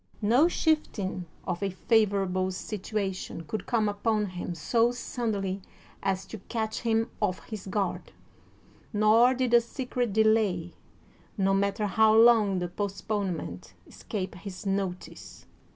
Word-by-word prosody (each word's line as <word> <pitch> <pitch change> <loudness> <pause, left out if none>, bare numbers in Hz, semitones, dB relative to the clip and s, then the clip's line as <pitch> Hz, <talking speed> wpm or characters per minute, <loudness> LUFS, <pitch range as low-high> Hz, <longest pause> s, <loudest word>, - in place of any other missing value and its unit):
No 245 +10 +5
shifting 210 - -1 0.2
of 180 -1 -3
a 200 - 0
favorable 195 -2 +1
sit 190 +2 -5
uation 190 -5 -3
could 190 +6 -5
come 225 -3 +2
upon 210 +1 0
him 180 -2 -5
so 230 +9 +2
suddenly 215 -6 -3 0.4
as 195 -1 -1
to 220 - -8
catch 220 -2 -2
him 225 -1 0
ofif 185 -3 -1
his 215 -4 -8
guard, 200 0 -2 0.8
nor 225 +4 +5
did 250 -1 0
a 240 - +8
secret 245 -1 -3
delay, 210 -5 +2 0.6
no 195 -1 +2
matter 200 +2 +1
how 220 +2 +4
long 225 -4 +6
the 180 -1 -1
postponement, 195 - -4
escape 190 -3 -5
his 185 +1 -9
notice. 195 -2 -4
205 Hz, 130 wpm, -28 LUFS, 190-225 Hz, 0.8 s, a